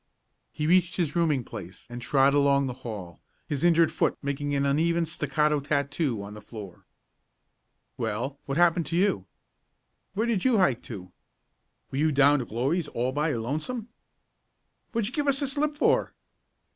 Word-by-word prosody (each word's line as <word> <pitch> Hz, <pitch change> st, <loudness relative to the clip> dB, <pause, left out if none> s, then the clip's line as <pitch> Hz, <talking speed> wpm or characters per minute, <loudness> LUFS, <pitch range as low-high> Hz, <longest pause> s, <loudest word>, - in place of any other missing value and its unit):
He 150 Hz, -, -3 dB
reached 180 Hz, +2 st, +3 dB
his 165 Hz, -4 st, -1 dB
rooming 155 Hz, -7 st, +2 dB
place 90 Hz, -4 st, -9 dB
and 120 Hz, 0 st, -7 dB
trod 135 Hz, +2 st, +3 dB
along 140 Hz, -1 st, +4 dB
the 130 Hz, -, -3 dB
hall, 100 Hz, -, -7 dB, 0.3 s
his 145 Hz, +1 st, -2 dB
injured 170 Hz, -1 st, +5 dB
foot -, -, +1 dB
making 140 Hz, +1 st, -2 dB
an 140 Hz, 0 st, +1 dB
uneven 165 Hz, +4 st, +2 dB
staccato 150 Hz, -1 st, 0 dB
tattoo 140 Hz, -4 st, -1 dB
on 100 Hz, +1 st, -8 dB
the 105 Hz, -, -10 dB
floor. 105 Hz, -4 st, -10 dB, 1.1 s
"Well, 135 Hz, +7 st, -3 dB
what 135 Hz, +1 st, -2 dB
happened 175 Hz, -1 st, +3 dB
to 165 Hz, -, -2 dB
you?" 170 Hz, -, +1 dB, 0.9 s
"Where 220 Hz, +3 st, +1 dB
did 225 Hz, -6 st, 0 dB
you 255 Hz, -4 st, +4 dB
hike 140 Hz, -, +3 dB
to?" 90 Hz, -6 st, -8 dB, 0.8 s
"Were 135 Hz, -, -2 dB
you 155 Hz, +1 st, +3 dB
down 145 Hz, +1 st, +5 dB
to 125 Hz, -, -3 dB
Glory's 135 Hz, +10 st, -1 dB
all 125 Hz, +2 st, -1 dB
by 150 Hz, +4 st, 0 dB
your 120 Hz, -6 st, -1 dB
lonesome?" 155 Hz, -, -3 dB, 1.0 s
"What'd 230 Hz, -3 st, 0 dB
you 245 Hz, -, -6 dB
give 290 Hz, 0 st, -1 dB
us 275 Hz, -1 st, +3 dB
the 280 Hz, -, 0 dB
slip 295 Hz, +2 st, -1 dB
for?" -, -, +2 dB
145 Hz, 170 wpm, -27 LUFS, 130-170 Hz, 1.1 s, injured